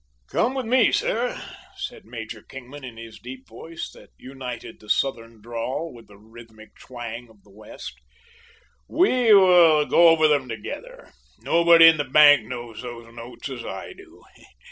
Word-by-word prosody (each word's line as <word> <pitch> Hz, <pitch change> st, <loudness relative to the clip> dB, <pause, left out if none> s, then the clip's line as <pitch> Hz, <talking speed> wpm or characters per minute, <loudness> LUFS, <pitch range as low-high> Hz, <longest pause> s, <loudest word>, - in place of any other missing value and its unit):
"Come 255 Hz, +3 st, 0 dB
with 260 Hz, -2 st, -3 dB
me, 245 Hz, +1 st, +3 dB
sir," 240 Hz, +2 st, -1 dB, 0.4 s
said -, -, -8 dB
Major 110 Hz, -1 st, -9 dB
Kingman, 135 Hz, +4 st, -12 dB
in 120 Hz, -3 st, -10 dB
his 115 Hz, -1 st, -11 dB
deep 130 Hz, +1 st, -11 dB
voice, 160 Hz, +8 st, -9 dB
that -, -, -17 dB
united 125 Hz, -3 st, -9 dB
the 105 Hz, -, -17 dB
Southern 115 Hz, -5 st, -2 dB
drawl 120 Hz, +7 st, -5 dB
with 120 Hz, -1 st, -15 dB
the 100 Hz, -, -17 dB
rhythmic 110 Hz, 0 st, -16 dB
twang 120 Hz, -1 st, -9 dB
of 105 Hz, -3 st, -23 dB
the 100 Hz, -, -22 dB
West; 105 Hz, -, -11 dB, 0.9 s
"We 255 Hz, -, +2 dB
will 175 Hz, -6 st, +6 dB
go 170 Hz, +3 st, +5 dB
over 160 Hz, -1 st, +5 dB
them 145 Hz, -4 st, 0 dB
together. -, -, -9 dB, 0.3 s
Nobody 170 Hz, 0 st, +6 dB
in 165 Hz, -1 st, +6 dB
the 145 Hz, -, -1 dB
bank 145 Hz, -5 st, +5 dB
knows 120 Hz, -2 st, -8 dB
those 120 Hz, -2 st, -10 dB
notes 120 Hz, +3 st, -9 dB
as 125 Hz, -3 st, -7 dB
I -, -, -8 dB
do. 375 Hz, -2 st, -18 dB
130 Hz, 160 wpm, -23 LUFS, 115-165 Hz, 0.9 s, will